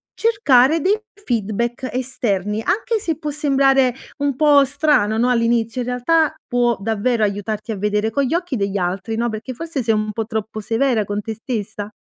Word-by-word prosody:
cercare 325 - +4
dei 395 +7 +2 0.3
feedback 235 +3 -2
esterni, 220 -5 -1
anche 430 - 0
se 325 -7 -2
può 300 - -4
sembrare 270 -3 +3 0.3
un 285 -1 0
po' 290 -2 +6
strano, 275 -6 +2
no, 240 +2 +2
all'inizio, 230 0 +1
in 245 - -4
realtà 305 +6 +2
può 240 -2 +1
davvero 225 +3 0
aiutarti 210 +2 -2
a - - -6
vedere 210 +2 0
con 280 +5 +1
gli 265 - -1
occhi 345 -5 -2
degli 200 -1 -1
altri, 190 +4 -2
no, 235 +1 0
perché 220 +4 -5
forse 310 0 -4
sei 225 0 +2
un 215 0 -1
po' 225 +1 -2
troppo 220 -1 -4
severa 225 +1 +1
con 205 +1 -3
te 220 +2 -5
stessa? 210 -2 -5
240 Hz, 180 wpm, -20 LUFS, 215-275 Hz, 0.3 s, po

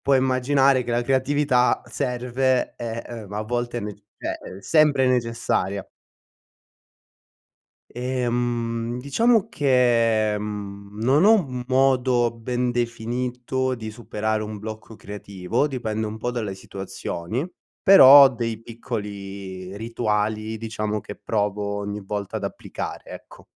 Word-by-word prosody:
Puoi 140 -1 +5
immaginare 130 +1 +3
che 120 - -7
la 120 0 +1
creatività 135 0 +2
serve 125 +1 0
e, 115 -1 -5
ehm, 110 -4 -8
a 105 - -2
volte 120 +2 -2
è - - -1
nec 105 -1 -6 0.2
cioè, - - -3 0.2
è - - -13
sempre 150 +1 +4
necessaria. 115 -6 0 2.1
Ehm, 120 -1 -1
diciamo 220 - +2
che, 115 -6 +3
mhmm, 100 -1 -7
non 140 +8 +4
ho 220 - +8
un 135 - 0
modo 130 -2 +3
ben 120 +2 -2
definito 125 +2 -2
di 110 -2 -7
superare 110 -1 -2
un 105 -1 -6
blocco 110 +1 -8
creativo. 100 +5 -3
Dipende 110 -5 -3
un 105 +1 -6
po' 120 +2 -2
dalle 110 -6 -3
situazioni, 95 - -5 0.4
però 145 -7 +10
ho 135 - +7
dei 115 -3 -4
piccoli 100 -5 -6
rituali, 110 -1 -1
diciamo, 105 -1 -3
che 105 - -8
provo 105 -1 -1
ogni 100 0 -4
volta 100 +2 -4
ad 100 - -4
applicare, 100 - -6
ecco. - - -12
115 Hz, 125 wpm, -23 LUFS, 105-125 Hz, 2.1 s, però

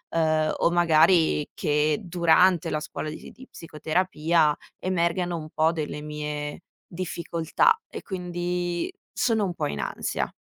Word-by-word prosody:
ehm, 155 -1 +2
o 170 - +3
magari 165 -2 +4
che 150 0 +1
durante 175 0 +3
la 155 - -1
scuola 155 0 -5
di 155 - -7
si - - -11
di 260 0 -14
psicoterapia 160 -1 0 0.2
emergano 175 -1 0
un 155 -1 -7
po' 160 +2 +2
delle 150 -2 -4
mie 150 0 -5 0.3
difficoltà 170 - 0
e - - -7
quindi, 175 - -3 0.2
sono 225 -3 +1
un 180 - -3
po' - - -2
in 70 -1 -4
ansia. - - -3
165 Hz, 140 wpm, -25 LUFS, 155-180 Hz, 0.3 s, magari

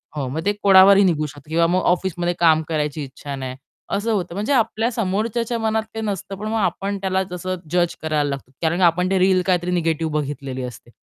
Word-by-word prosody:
हो. 140 -3 -2
मग 150 +5 -3
ते 205 - +2
कोणावरही 195 0 +7
निघू 160 -5 +2
शकतो 145 0 -11
किंवा 165 +1 +3
मग 180 +2 +1
ऑफिसमध्ये 175 -1 -2
काम 160 -2 +5
करायची 150 -1 -2
इच्छा 140 +1 -7
नाही, 130 -1 -5 0.3
असं 210 +3 -1
होतं. 180 -5 -1
म्हणजे 215 +8 0
आपल्या 230 -1 +1
समोरच्याच्या 225 +2 -1
मनात 220 0 0
काही 225 -1 -4
नसतं 195 -1 -4
पण 210 +2 -6
मग 220 +1 -1
आपण 200 0 -1
त्याला 190 0 0
जसं 185 +1 -3 0.2
जज 175 -1 +1
करायला 150 -2 0
लागतो. 135 -2 -6
कारण 170 +1 +1
का 180 - +5
आपण 180 +2 +2
ते 190 - +2
रील 185 0 +4
काहीतरी 180 -1 +1
निगेटिव्ह 165 -2 0
बघितलेली 140 -3 -3
असते. 120 -1 -9
180 Hz, 205 wpm, -21 LUFS, 155-200 Hz, 0.3 s, कोणावरही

